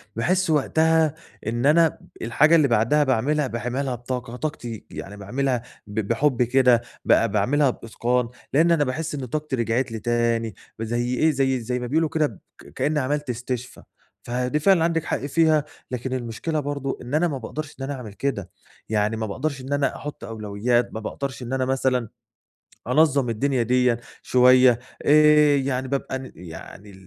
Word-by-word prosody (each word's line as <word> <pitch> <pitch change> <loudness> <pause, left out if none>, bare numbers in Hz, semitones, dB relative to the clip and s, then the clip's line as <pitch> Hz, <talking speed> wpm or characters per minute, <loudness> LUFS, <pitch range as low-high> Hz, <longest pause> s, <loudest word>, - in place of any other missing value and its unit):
باحس 185 +9 +1
وقتها 160 +1 +2 0.3
إن 120 +3 -1
أنا 165 +3 +6
ب - - -8 0.3
الحاجة 150 +8 +4
اللي 155 -4 +5
بعدها 120 +5 +3
باعملها 140 +3 +1
باعملها 125 +3 -2
بطاقة 120 0 -5
طاقتي، 125 -6 -5
يعني 100 +1 -8
باعملها 125 +5 -1 0.3
ب 105 +1 -3
بحُب 120 +5 +1
كده 125 -1 +4 0.2
ب - - +5 0.2
باعملها 130 +8 +2
بإتقان، 120 +1 -1 0.2
لإن 165 +5 +4
أنا 165 -3 +4
باحس 150 +4 -3
إن 135 -3 -4
طاقتي 150 +2 -3
رِجعِت 120 +1 0
لي 110 - -4
تاني، 115 -2 0 0.3
زي 120 +2 -1
إيه 160 +5 +3
زي 135 -2 +1
زي 125 +2 -3
ما 125 - -4
بيقولوا 160 +4 +1
كده 155 -1 +1
ب 110 - -13 0.4
كإني 150 +1 0
عملت 145 +1 -2
استشفا، 125 +1 -5 0.4
فدي 125 +4 -1
فعلًا 175 +1 +4
عندِك 165 -1 +1
حق - - -1
فيها، 155 +1 +3 0.3
لكن 125 +1 -3
المشكلة 130 +6 -3
برضه 140 -1 -3
إن 125 +2 -8
أنا 170 +3 +3
ما 145 -5 -3
باقدرش 145 +5 -6
إن - - -4
أنا 140 +2 -3
أعمل 120 -7 -8
كده، 100 -5 -3 0.4
يعني 105 0 +1
ما 110 - -2
باقدرش 135 +6 -3
إن 135 +2 -4
أنا 145 -1 0
احط 150 0 -8
أولويات، 110 +2 -1
ما 110 - -4
باقدرش 135 +4 -5
إن 120 +2 -5
أنا 130 -1 0
مثلًا 130 -3 0 0.8
أنظّم 140 0 +3
الدنيا 130 +3 0
ديّة 125 0 +2 0.2
شوية، 125 -1 +5 0.2
آآ 150 0 +6
يعني 130 -1 -1
بابقى 130 -1 -3
يعني 90 +4 -11
130 Hz, 165 wpm, -23 LUFS, 120-145 Hz, 0.8 s, أنا